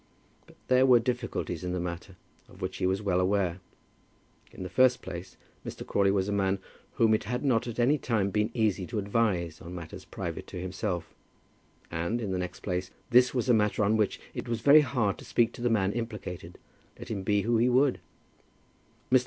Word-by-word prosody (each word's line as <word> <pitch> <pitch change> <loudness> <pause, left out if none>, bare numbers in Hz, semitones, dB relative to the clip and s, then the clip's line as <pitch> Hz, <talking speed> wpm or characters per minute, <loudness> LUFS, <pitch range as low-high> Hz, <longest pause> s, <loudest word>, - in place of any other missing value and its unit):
But - - -18
there 130 +1 +5
were 125 -2 +7
difficulties 120 - -2
in 90 0 -2
the 90 - -1
matter 85 +2 -5 0.3
of 90 - -16
which 95 -1 -4
he 90 - +1
was 95 +3 0
well 95 -3 +1
aware. 95 -1 +1 0.9
In - - -8
the - - -4
first 125 +6 +3
place 90 -1 -8 0.3
Mr. - - -7
Crawley 100 -1 +2
was 95 -1 +1
a - - -1
man 100 -1 +1 0.4
whom 115 -1 +3
it 110 - 0
had 125 +6 -2
not 125 -3 +2
at 120 - -5
any 135 +5 +3
time 105 -6 0
been 105 +2 +1
easy 105 -5 +1
to 115 - -4
advise 100 -6 0
on 90 +2 -8
matters 85 -3 -8
private - - -6
to - - -7
himself; 95 -1 -3 0.8
and, 85 +8 -1
in 105 -5 -3
the 95 - -1
next 90 0 -5
place, 90 -1 -2 0.2
this 125 +2 +5
was 125 -1 0
a 125 - +5
matter 105 -1 +2
on 105 +2 +3
which 105 -2 +1
it - - -6
was 115 -1 -2
very 145 +4 +8
hard 115 -8 0
to - - -10
speak 115 0 +2
to - - -10
the 120 - +2
man 100 -4 +2
implicated, 105 -7 -6 0.4
let - - -9
him 100 -3 -2
be 100 +1 +1
who 115 +1 +2
he 120 +3 +3
would. 130 +2 +3 1.1
Mr. 130 - +7
105 Hz, 205 wpm, -29 LUFS, 95-120 Hz, 1.1 s, very